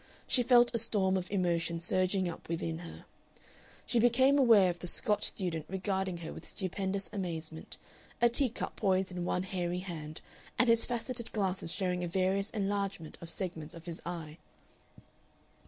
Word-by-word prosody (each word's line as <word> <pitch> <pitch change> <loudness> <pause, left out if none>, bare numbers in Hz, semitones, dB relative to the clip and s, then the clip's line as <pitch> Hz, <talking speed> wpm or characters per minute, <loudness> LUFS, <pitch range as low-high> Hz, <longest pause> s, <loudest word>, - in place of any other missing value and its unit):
She 250 - +3
felt 240 0 +5
a 230 - +1
storm 195 -4 +1
of 185 -1 -2
emotion 170 -3 0
surging 185 +2 +1
up 170 - -7
within 165 -1 -2
her. 170 -1 -10 0.8
She 240 - +2
became 260 +4 +5
aware 220 -8 +7
of 175 - -9
the 180 - -5
Scotch 210 +4 0
student 165 -5 -2
regarding 190 -1 -1
her - - -5
with - - -10
stupendous 195 +1 -2
amazement, 165 -5 -4 0.4
a 240 - +6
tea 250 +3 +2
cup 230 - -5
poised 190 -2 +2
in 180 -1 -3
one 180 - 0
hairy 180 -2 -2
hand 155 -4 -7 0.4
and 250 - +4
his 230 0 +4
faceted 240 0 -3
glasses 190 -5 -1
showing 180 -2 -1
a - - -1
various 190 +3 +1
enlargement 200 -5 -2
of 170 - -7
segments 165 -3 -4
of 165 -1 -11
his 170 -2 -6
eye. 160 -3 -6
190 Hz, 165 wpm, -32 LUFS, 170-210 Hz, 0.8 s, aware